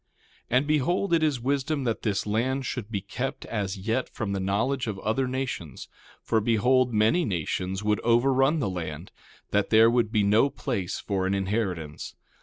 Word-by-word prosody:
1:8 125 - +3
And 135 - +2
behold, 160 +6 +1
it 165 - +4
is 150 -5 +1
wisdom 140 +3 -1
that 115 -3 -1
this 100 -2 -1
land 130 +6 0
should 120 -4 -4
be 100 -4 -2
kept 130 +7 -5
as 100 -3 -3
yet 115 +6 -1
from 110 -3 -4
the 100 - -1
knowledge 115 +8 0
of 105 -3 -3
other 110 +7 -1
nations; 125 - -4 0.3
for 110 - +1
behold, 120 +3 +3
many 110 +11 +3
nations 95 - -2
would 105 0 +1
overrun 135 +5 +3
the 140 - 0
land, 85 -2 -5 0.4
that 100 -1 +1
there 115 +1 +6
would 120 -3 +1
be 105 -2 +2
no 105 +7 +4
place 120 -9 -3
for 95 -2 -1
an 95 - +1
inheritance. 95 -6 -3
115 Hz, 180 wpm, -26 LUFS, 100-130 Hz, 0.4 s, there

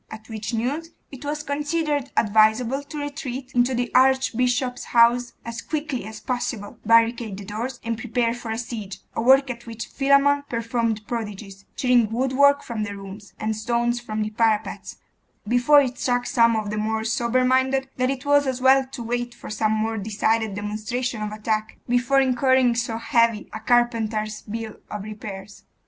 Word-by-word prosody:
At 220 +1 -11
which 220 0 -5
news 270 +8 -2 0.2
it 270 0 -10
was 295 +1 -3
considered 295 -1 -1
advisable 220 +5 +3
to 300 - -8
retreat 280 -3 -5
into 245 0 +2
the 245 0 -2
archbishop's 250 -1 +2
house 240 +1 +3
as 230 0 -5
quickly 300 -6 -3
as 215 0 -8
possible, 240 -5 -4
barricade 230 -2 +3
the 200 - -8
doors, 235 +6 -5
and 230 -1 -3
prepare 235 0 0
for 240 -1 -8
a 220 - -2
siege 225 -5 -6 0.2
a - - -2
work 265 +2 +5
at 235 0 -10
which 230 -1 -6
Philammon 280 +1 +3
performed 230 -2 -1
prodigies, 210 -4 -6
tearing 245 -4 +3
woodwork 265 +4 +3
from 230 -3 -4
the 205 -1 -4
rooms, 195 +1 -10
and 215 0 -1
stones 235 +2 0
from 215 -3 -3
the 215 - -4
parapets, 220 -1 -1 0.5
before 245 +6 +5
it 255 -2 -3
struck 245 -1 0
some 230 -1 +3
of 215 -2 -2
the 215 - -3
more 220 +1 -1
sober 235 +3 +1
minded 260 +1 +2
that 255 0 +1
it 270 0 -3
was 285 0 +4
as 260 -1 -1
well 265 +1 +5
to 260 -2 -7
wait 240 +1 -3
for - - -9
some 215 0 0
more 220 0 -1
decided 220 +1 0
demonstration 215 +3 -3
of 210 0 -3
attack, 215 0 -2
before 245 +3 +3
incurring 260 -1 +3
so 230 -1 -2
heavy 230 -1 +1
a 220 - -5
carpenter's 220 -2 +1
bill 225 0 -5
of 210 -2 -5
repairs. 205 -2 -8
235 Hz, 170 wpm, -23 LUFS, 220-255 Hz, 0.5 s, work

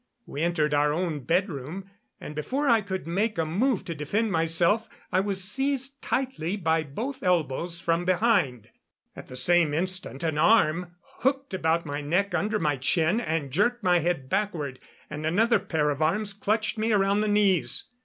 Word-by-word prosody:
We 145 - -6
entered 160 -3 +1
our 145 0 +3
own 165 -1 -2
bedroom, 175 0 -2 0.3
and 150 - -8
before 260 - -2
I 230 -3 +4
could 190 -2 -5
make 200 +6 -1
a 165 - +1
move 200 - 0
to 170 - -4
defend 195 +9 -1
myself 170 +6 +2 0.2
I 185 - +3
was 195 -1 -1
seized 270 +5 -1
tightly 230 -9 -2
by 165 -3 +1
both 220 - -5
elbows 170 -1 0
from 170 +1 0
behind. 180 - +1 0.5
At - - -10
the 125 - -10
same 165 +2 +3
instant 180 -5 -2
an 160 -2 -1
arm 175 -3 +3 0.2
hooked 270 -1 -1
around 165 -2 0
my 145 0 -4
neck 180 +7 0
under 215 +1 0
my 150 -6 0
chin 160 - +2
and 160 - -2
jerked 220 - +1
my 180 -2 +4
head 165 -5 -1
backward, 165 -8 -2 0.3
and 150 +1 -7
another 215 +8 +3
pair 160 -6 0
of 145 +1 -4
arms 200 +6 0
clutched 215 +2 -1
me 225 +1 +1
around 200 0 +2
the 215 - 0
knees. 205 -4 +2
180 Hz, 175 wpm, -26 LUFS, 155-210 Hz, 0.5 s, I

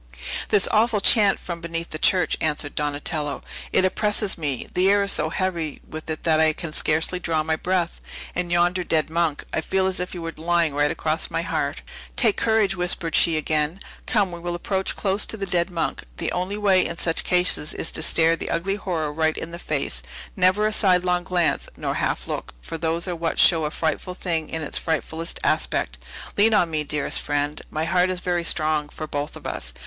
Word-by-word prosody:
"This 200 - +4
awful 220 0 +3
chant 200 0 +4
from 170 -2 -6
beneath 170 0 -4
the 155 - -4
church," 180 +2 +3
answered 150 -1 -1
Donatello; 145 0 -2 0.3
"it 190 - +4
oppresses 210 +1 0
me; 145 -6 -3
the 185 +1 +3
air 200 0 +4
is 200 - 0
so 155 - +1
heavy 170 -4 -2
with 155 +1 -8
it 155 - -4
that 160 -2 +3
I 160 0 +4
can 160 -1 -6
scarcely 160 +5 +1
draw 160 -3 0
my 160 0 0
breath. 175 +1 -1 0.3
And 175 -1 -2
yonder 175 +1 +2
dead 155 -2 0
monk! 165 -3 0
I - - +1
feel 190 +3 0
as 190 -1 -1
if 180 - -4
he - - -6
were 165 -1 -5
lying 170 -1 +1
right 145 +1 +2
across 155 +2 -1
my - - -2
heart." - - -2 0.3
"Take 225 -5 +4
courage!" 220 -4 +2
whispered 175 -2 -1
she 165 -2 +4
again 155 +3 0 0.3
"come, 205 -6 +2
we 170 - -7
will 175 0 -3
approach 190 +2 -1
close 200 0 +1
to 220 - +1
the 200 - -3
dead 175 -1 +1
monk. 170 -2 -2 0.2
The - - -2
only 185 +3 -2
way, 195 -3 +4
in 170 - -4
such 165 -1 +1
cases, 180 -4 +2
is 160 - -1
to - - -2
stare 165 +1 +4
the - - -6
ugly 195 +4 -1
horror 160 -7 -2
right 160 0 +1
in 165 - -5
the 170 - -7
face; - - -2 0.3
never 185 +2 +3
a 215 - +1
sidelong 180 -3 +2
glance, 180 -3 +1
nor - - -2
half - - -1
look, - - -5
for 160 - -7
those 165 +2 -1
are 180 - -2
what 165 0 -2
show 165 -3 +5
a - - 0
frightfull 165 +3 -2
thing 165 -4 -2
in 160 -1 -3
its 150 - 0
frightfullest 160 +1 -3
aspect. - - 0 0.4
Lean 215 +2 +5
on 175 -5 +3
me, 155 -1 0
dearest 150 0 -1
friend! 145 +1 -1
My 155 +1 -2
heart 180 +2 +2
is 185 -1 -2
very 175 -1 -1
strong 155 -2 +1
for 155 - -6
both 145 -1 -4
of - - -12
us. - - -5
170 Hz, 210 wpm, -23 LUFS, 155-185 Hz, 0.4 s, show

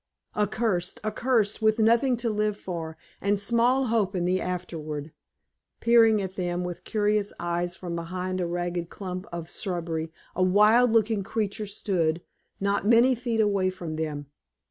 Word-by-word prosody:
Accursed, 210 -1 0
accursed, 220 -1 +1
with 215 0 +3
nothing 235 +3 +3
to 235 0 -1
live 210 -1 0
for, 165 -3 -6 0.2
and 200 0 +1
small 240 +5 +2
hope 215 -5 +1
in 175 -1 0
the 185 +1 +1
afterward! 160 -4 -4 0.7
Peering 225 -2 +5
at 190 0 -6
them 175 -1 -2
with 180 -1 -6
curious 210 -1 +1
eyes 175 0 -2
from 175 -2 -5
behind 185 +2 -3
a 175 - -1
ragged 175 0 -3
clump 185 0 -6
of 170 -1 -6
shrubbery, 165 -3 -3 0.2
a 185 - -1
wild 210 +6 +5
looking 220 -2 +2
creature 210 +1 -3
stood, 175 -5 -1 0.4
not 200 +1 0
many 235 +3 +6
feet 235 -2 0
away 200 -3 +2
from 175 -4 -6
them. 150 -2 -3
195 Hz, 150 wpm, -26 LUFS, 175-220 Hz, 0.7 s, many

